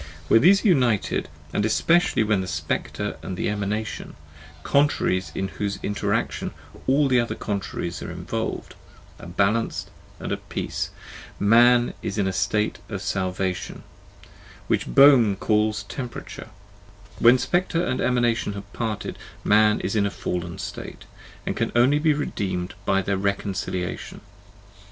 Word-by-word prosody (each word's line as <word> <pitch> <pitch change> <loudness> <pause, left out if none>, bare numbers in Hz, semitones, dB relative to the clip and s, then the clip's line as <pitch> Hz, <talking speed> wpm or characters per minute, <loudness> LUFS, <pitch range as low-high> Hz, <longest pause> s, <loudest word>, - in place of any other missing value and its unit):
When 115 - +6
these 195 +6 +5
are - - +6
united, 125 - +2 0.2
and 105 - +1
especially 165 +5 +3
when 105 -3 +1
the 95 - -5
Spectre 75 -1 -3
and 95 - -5
the - - -1
Emanation, 105 +1 -3 0.5
contraries 140 -10 +1
in 95 - -2
whose 100 0 -3
inter 105 - -1
action - - -1 0.3
all 140 +2 +4
other 120 - -3
contraries 95 -4 -4
are - - -5
involved, - - -4 0.5
are - - -10
balanced 100 +6 0 0.3
and - - -5
at - - -5
peace, - - -3 0.5
Man 120 +3 +5
is 100 - -4
in 100 - +2
the 95 - -1
state 100 +3 0
of 100 - -4
salvation, 95 -1 -2 0.8
which - - 0
Boehme 115 - +6
called 105 0 +1
temperature; 125 0 -7 0.7
when 120 +2 +7
Spectre 170 +6 0
and 130 - -1
Emanation 120 -4 +1
have 100 0 -9
parted, 110 -3 -4 0.2
Man 105 0 +4
is 100 - -2
in 100 -1 +3
a - - -1
fallen 85 -3 -4
state, - - -7 0.4
and - - -2
can - - -1
only 130 +5 +4
be 155 -1 +3
redeemed 95 -9 -3
by 95 0 +2
their 100 +1 0
reconciliation. 95 -2 -3
105 Hz, 140 wpm, -24 LUFS, 95-120 Hz, 0.8 s, when